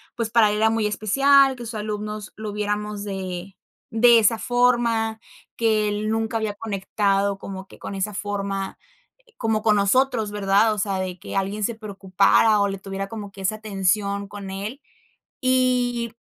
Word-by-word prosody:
pues 230 -2 -2
para 225 -2 +5
él 210 - 0
era 220 +1 +3
muy 220 -1 +1
especial, 270 +6 +4
que 240 - -7
sus 225 - -6
alumnos 210 0 -5
lo 215 -1 -5
viéramos 210 0 -3
de 190 -1 -6 0.4
de 235 +1 +6
esa 225 +1 +3
forma, 235 -2 +1 0.4
que 215 -2 +2
él 210 +1 -2
nunca 225 0 -1
había 215 -2 -2
conectado 200 -1 0
como 190 0 -8
que - - -15
con - - -7
esa 195 +2 -2
forma, 200 -1 -4 0.6
como 225 -2 0
con 215 -2 +4
nosotros, 220 +1 +2
¿verdad? 205 +2 +3
O - - -6
sea, 195 -1 -1
de 185 -1 -4
que - - -8
alguien 195 +2 -1
se 235 - -2
preocupara, 200 0 +2
o 200 - +2
le 195 - -4
tuviera 195 0 -5
como 210 -3 -7
que 195 - -10
esa 190 +3 0
atención 200 -1 -1
con 200 -2 -8
él. 205 +8 -5 0.6
Y, 250 -2 +1
210 Hz, 170 wpm, -23 LUFS, 200-225 Hz, 0.6 s, de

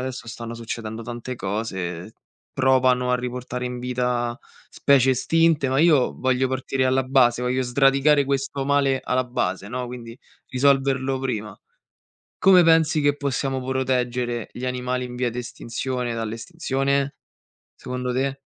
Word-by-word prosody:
adesso, 130 -1 -5
stanno 115 0 -7
succedendo 115 -1 -6
tante 120 +2 -6
cose, 95 -3 -4 0.4
provano 130 -1 +3
a 125 - +3
riportare 125 0 -4
in 125 0 -5
vita 125 -1 -1 0.3
specie 135 -2 +3
estinte, 160 +2 +2
ma 130 +1 +1
io 155 -6 +4
voglio 130 0 +1
partire 130 0 -1
alla 130 +1 +2
base, 125 -2 +3
voglio 125 +1 0
sradicare 135 +3 +3
questo 140 0 -2
male 140 -1 +2
alla 130 0 0
base, 100 -5 -2
no, 125 +2 -4
quindi 120 -1 -9 0.3
risolverlo 135 0 +2
prima. 110 -6 -4 0.8
Come 185 -2 +7
pensi 160 -1 +4
che 145 0 +2
possiamo 135 -2 -2
proteggere 125 -2 -1
gli 125 - -7
animali 125 0 -2
in 125 - -9
via 125 -1 0
di 120 - -6
estinzione 125 +1 -4
dall'estinzione? 135 +4 -2 0.6
Secondo 125 0 -4
te? 135 +2 -1
125 Hz, 135 wpm, -23 LUFS, 120-135 Hz, 0.8 s, Come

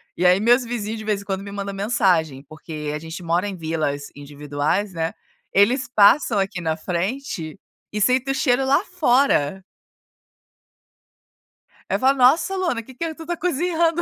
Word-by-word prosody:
E 180 - -1
aí, 180 +2 +5
meus 240 +3 +4
vizinhos 225 -2 -4
de 220 - -7
vez 210 -2 -1
em - - -14
quando, 195 -1 -3
me 200 - -8
mandam 200 0 -5
mensagem, 185 - +1
porque 155 -1 -6
a - - -4
gente 165 +3 -8
mora 175 +4 0
em 190 - -7
vilas 155 -3 -2
individuais, 145 +7 -3
né, 165 0 -2 0.4
eles 240 +7 +3
passam 210 +1 +5
aqui 190 -2 -2
na 160 -1 -1
frente, 180 - -4 0.3
e 210 - -3
sentem 255 +5 +2
o - - -1
cheiro 265 -1 +2
lá 270 +2 +4 0.2
fora. 245 - +2 2.3
Aí - - +1
falam: 265 +1 +3
"Nossa 280 +9 +4
Luana, 340 -12 -1
que 260 - -14
que 320 +5 -4
tu 325 - -9
está 345 +2 -3
cozinhando?" 340 0 0
205 Hz, 165 wpm, -22 LUFS, 165-260 Hz, 2.3 s, aí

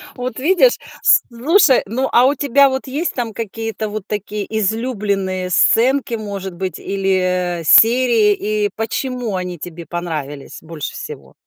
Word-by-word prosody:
Вот 250 -2 -5
видишь! 375 - +3 0.3
Слушай, 315 - +4
ну, 245 +6 -2
а 245 - +5
у 275 +2 +3
тебя 280 0 +3
вот 265 +1 -4
есть 295 +7 -2
там 235 -3 -4
какие-то 225 0 -5
вот 215 -1 -5
такие 210 0 -4
излюбленные 200 -4 -2
сценки, 245 +7 +2
может 200 -4 -6
быть, 185 -1 -5
или 185 -3 -1
серии, 230 +1 +5
и 210 0 -1
почему 240 0 -3
они 180 -1 -4
тебе 170 +1 -9
понравились 155 -5 -6
больше 160 -2 -7
всего? - - -9
215 Hz, 135 wpm, -18 LUFS, 185-255 Hz, 0.3 s, а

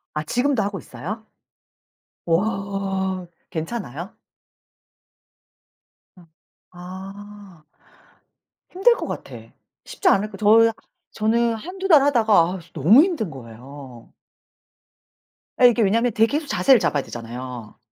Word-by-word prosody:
아 150 - -2
지금도 245 - 0
하고 200 -1 -3
있어요? 215 +8 -8 1.0
우와 190 0 -2 0.2
괜찮아요? 170 - -6 2.0
음 175 - -18 0.4
아. 190 0 -11 1.1
힘들 390 +7 +4
것 - - -5
같아. - - -7 0.5
쉽지 385 - -1
않을 210 - +2
거 200 - -10
저 225 +3 +5 0.4
저는 230 +2 +1
1-2 375 - -6
달 300 -6 +7
하다가 235 -6 +2 0.2
아우씨 180 -2 -9
너무 190 - +6
힘든 330 - -2
거예요. 130 0 -12 1.5
예 245 - +10
이게 235 -1 +1
왜냐면 230 +4 +2
되게 220 +2 +3
계속 310 - -8
자세를 265 -3 +4
잡아야 145 -7 0
되잖아요. 120 -1 -8
200 Hz, 215 characters per minute, -22 LUFS, 165-235 Hz, 2.0 s, 예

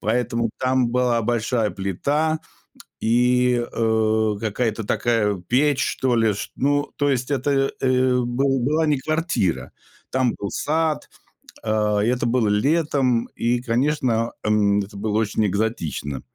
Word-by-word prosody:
поэтому 115 +1 0
там 130 -1 +1
была 120 -1 +1
большая 115 -1 0
плита 140 - -1 0.6
и, 125 +1 +2
э, 110 -1 +1
какая-то 110 0 -2
такая 105 -3 +1
печь 135 +9 +1
что 125 -2 0
ли, 110 -3 +2
чт - - -6
ну, 145 +2 +1
то 145 -1 +1
есть 125 0 -1
это, 135 0 +1
э, 130 -1 +2
был 135 +3 0
была 155 +6 +1
не 150 -2 +2
квартира, 130 - -1 0.4
там 130 -2 +1
был 100 - -5
сад. 160 0 -1 0.6
Э, 105 -1 +1
и - - +1
это 125 0 0
было 120 -1 +1
летом 130 +1 +1
и, 120 +1 0
конечно, 120 -2 0
эм, 105 -1 +2
это 100 0 -5
было 105 +1 -1
очень 110 0 +1
экзотично 90 - -2
120 Hz, 135 wpm, -22 LUFS, 110-130 Hz, 0.6 s, и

